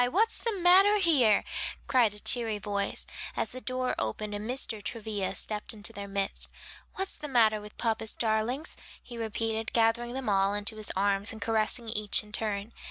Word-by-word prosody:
what's 440 - +2
the 460 - -1
matter 385 +4 +7
here?" 275 - +4 0.4
cried 250 -5 +3
a 210 - -10
cheery 225 -2 +2
voice, 200 -1 -2 0.3
as - - 0
the 255 - -7
door 255 0 -1
opened 205 - -2
and 210 +2 -5
Mr. 245 -4 -1
Travilla 205 -3 -3
stepped 210 +3 -2
into 210 +2 -3
their 200 -1 -6
midst. 195 0 -1 0.5
"What's 385 0 -3
the 300 - -6
matter 220 -5 +3
with 210 0 -12
papa's 225 -2 -1
darlings?" 230 +7 0 0.3
he 240 - -10
repeated, 225 0 -2
gathering 235 +1 +2
them 265 -2 -4
all 195 0 +2
into 205 +1 -2
his 215 -1 -2
arms, 200 +1 +1
and 220 - -8
caressing 225 +2 0
each 210 -1 +1
in 210 - -16
turn. 210 0 -3
220 Hz, 175 wpm, -29 LUFS, 205-245 Hz, 0.5 s, matter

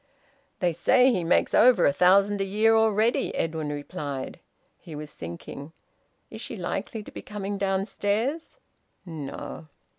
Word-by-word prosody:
"They 175 -2 +2
say 250 +10 +4
he 185 -7 0
makes 165 - +2
over 240 -5 +6
a 140 - +4
thousand 195 +5 +4
a - - +2
year 215 +3 +3
already," 220 +1 +2
Edwin 160 -2 -2
replied. 145 -2 -5 0.4
He 165 -4 -10
was 150 0 -8
thinking. 85 - -8 0.6
"Is - - -8
she - - -6
likely 220 -4 -4
to - - -12
be - - -8
coming 205 -1 -5
downstairs? 205 - -1 0.5
No." 160 -1 -7
195 Hz, 140 wpm, -26 LUFS, 155-215 Hz, 0.6 s, over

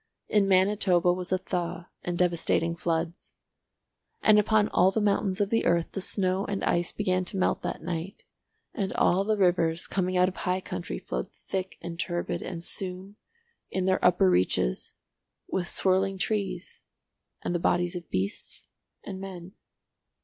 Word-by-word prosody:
In 205 -2 +3
Manitoba 185 -2 +3
was 180 0 -4
a 185 - +3
thaw 180 -2 -4
and 175 -1 -3
devastating 170 -1 +1
floods. 170 0 -3 0.9
And 215 -1 +7
upon 215 0 +3
all 180 +2 +4
the 195 - 0
mountains 200 -2 +1
of 205 -1 0
the 225 - +2
earth 170 -1 +2
the 195 - -4
snow 190 0 +1
and 200 -1 -3
ice 175 0 +1
began 185 -3 0
to 195 - -3
melt 185 - +1
that - - -4
night, 175 +3 -4 0.5
and 195 -5 -2
all 185 +3 +3
the 215 +1 +1
rivers 170 -3 +2
coming 185 -1 -1
out 180 0 +5
of 190 - -5
high 180 0 0
country 85 - -5
flowed 60 +1 -4
thick 190 -1 -5
and 170 0 -6
turbid, 175 -1 -2
and 170 -2 -5
soon—in 195 - -5
their 185 0 +1
upper 175 - +5
reaches—with 90 - -2
swirling 190 +1 +2
trees 190 -3 -3 0.6
and - - -1
the 175 - 0
bodies 175 +1 +1
of 175 -2 -7
beasts 95 +2 -4 0.4
and 190 -1 -7
men. 185 -2 -8
185 Hz, 155 wpm, -27 LUFS, 175-195 Hz, 0.9 s, And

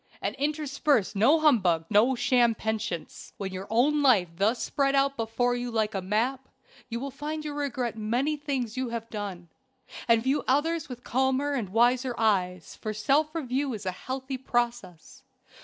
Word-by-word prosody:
And - - -2
intersperse 290 -5 0
no 275 +11 +4
humbug, 185 - +3
no 225 +6 +4
sham 240 -1 +3
penitence. 215 -6 -4
When 190 -2 -5
your 190 +1 -6
own 275 +7 +3
life 220 -11 +4
lies 165 +2 -22
thus 220 +4 +2
spread 275 -1 +1
out 275 0 +2
before 245 +1 0
you 245 0 -3
like 220 -2 0
a 195 - -2
map, 235 +8 -1 0.4
you 235 0 -3
will 275 +2 -5
find 305 +3 -5
you 300 - -4
regret 260 -6 -2
many 240 +8 0
things 275 -6 -3
you 260 -1 -2
have 230 -1 -5
done, 195 -5 -6 0.6
and 230 -1 +4
view 270 +3 +1
others 300 +3 +1
with 245 -1 -8
calmer 265 +3 +1
and 235 -9 -2
wiser 245 +4 +2
eyes; 185 -6 0
for 215 -1 -5
self 295 +8 +1
review 270 -3 -1
is 205 - -8
a 185 - 0
healthy 260 +7 -5
process. 240 -9 -3
245 Hz, 175 wpm, -27 LUFS, 215-275 Hz, 0.6 s, no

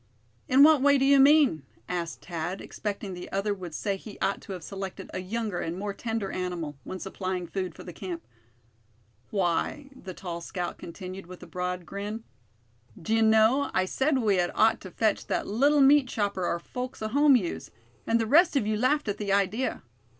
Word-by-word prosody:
"In 265 +2 +6
what 305 -2 +7
way 280 0 +5
do 270 - +2
you 280 0 +6
mean?" 280 - +5 0.3
asked 170 -2 -4
Thad, 175 +2 -4
expecting 205 -2 -5
the 180 0 -8
other 200 +1 0
would 180 -5 -8
say 200 -2 -1
he 205 +1 -11
ought 195 +1 0
to 195 - -7
have 180 -3 -7
selected 195 +1 -7
a - - -3
younger 210 -1 -3
and 165 +2 -3
more 200 +1 -3
tender 225 -3 -3
animal, 175 -5 -4
when 185 - -6
supplying 185 -1 -4
food 185 -1 -4
for - - -10
the 175 - -9
camp. 175 -1 -6 1.0
"Why," 200 - -1
the 185 -8 -9
tall 170 -2 -6
scout 175 +1 -5
continued, 185 +1 -8
with 180 0 -11
a - - -8
broad 180 -1 -4
grin; 205 +4 -5 0.8
"d'ye 225 +6 +1
know, 220 +5 +4
I 185 - +3
said 270 +8 +1
we 210 -6 +2
had 175 -1 +2
ought 220 0 +3
to 190 - -8
fetch 215 +3 0
that - - -1
little 280 +7 +3
meat 275 0 +6
chopper 200 -6 -1
our 170 - 0
folks 250 +7 -6
at 215 - -3
home 285 0 +6
use; 190 -9 -2 0.4
and 230 - +3
the 225 - +1
rest 315 +8 +5
of 270 - +2
you 215 0 0
laughed 290 +5 +1
at 205 - -2
the 205 -2 -2
idea. 200 +6 0
200 Hz, 195 wpm, -27 LUFS, 180-240 Hz, 1.0 s, what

